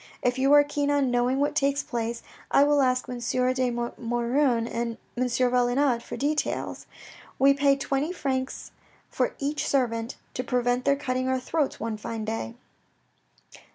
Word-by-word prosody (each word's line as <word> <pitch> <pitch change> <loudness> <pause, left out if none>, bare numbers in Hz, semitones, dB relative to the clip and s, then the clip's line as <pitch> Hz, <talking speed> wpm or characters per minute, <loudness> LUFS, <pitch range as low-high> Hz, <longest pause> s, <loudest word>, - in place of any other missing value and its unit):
If 245 +1 +1
you 270 +1 +3
are 290 0 +8
keen 290 0 -1
on 285 -3 +2
knowing 245 +2 +1
what 290 +1 +1
takes 280 0 +1
place, 235 -1 -3 0.3
I 280 - +5
will 290 0 +4
ask 255 -1 +1
M. 250 -1 -5
de 255 +1 +1
Maugiron 240 +1 0
and 235 -1 -3 0.2
M. 250 - 0
Valenod 250 +1 +2
for - - -7
details. 295 +2 -2 0.5
We 275 +1 +5
pay 280 0 +3
twenty 275 +3 -1
francs 265 -6 -3 0.4
for - - -1
each 290 +2 -2
servant, 235 -3 0 0.2
to 250 - -3
prevent 245 0 0
their 280 - +4
cutting 255 -2 -2
our 260 0 +1
throats 285 +3 -1
one 220 0 -3
fine 220 +1 -5
day. 215 - -4
255 Hz, 155 wpm, -26 LUFS, 240-280 Hz, 0.5 s, are